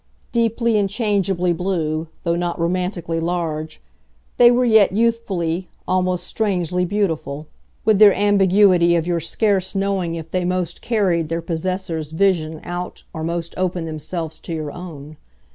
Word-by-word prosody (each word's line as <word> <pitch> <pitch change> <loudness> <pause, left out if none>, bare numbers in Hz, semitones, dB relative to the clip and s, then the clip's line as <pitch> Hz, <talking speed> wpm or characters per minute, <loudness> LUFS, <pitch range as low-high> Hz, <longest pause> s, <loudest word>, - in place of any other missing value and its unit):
Deeply 230 -1 +1
and 200 -1 +1
changeably 195 -5 0
blue, 165 -3 -1 0.2
though 170 -1 +1
not 175 0 -2
romantically 175 -1 -1
large, 160 -2 -3 0.6
they 240 -1 +8
were 245 +1 +3
yet 220 -5 +5
youthfully, 190 -6 0 0.2
almost 185 -1 0
strangely 180 -4 0
beautiful, 160 -7 -2 0.4
with 215 -2 +4
their 210 -1 +9
ambiguity 195 -3 +4
of 165 -1 0
your 175 -1 0
scarce 190 +3 0
knowing 195 -4 -1
if 160 -1 -8
they 185 -1 0
most 180 -1 -2
carried 185 -9 +1
their 165 0 -1
possessor's 165 -2 -3
vision 160 -4 +1
out 175 +1 -6
or 160 - -5
most 170 0 -3
opened 180 -2 -1
themselves 160 +1 -5
to - - -9
your 155 -2 -4
own. 155 -4 -9
180 Hz, 145 wpm, -21 LUFS, 165-195 Hz, 0.6 s, their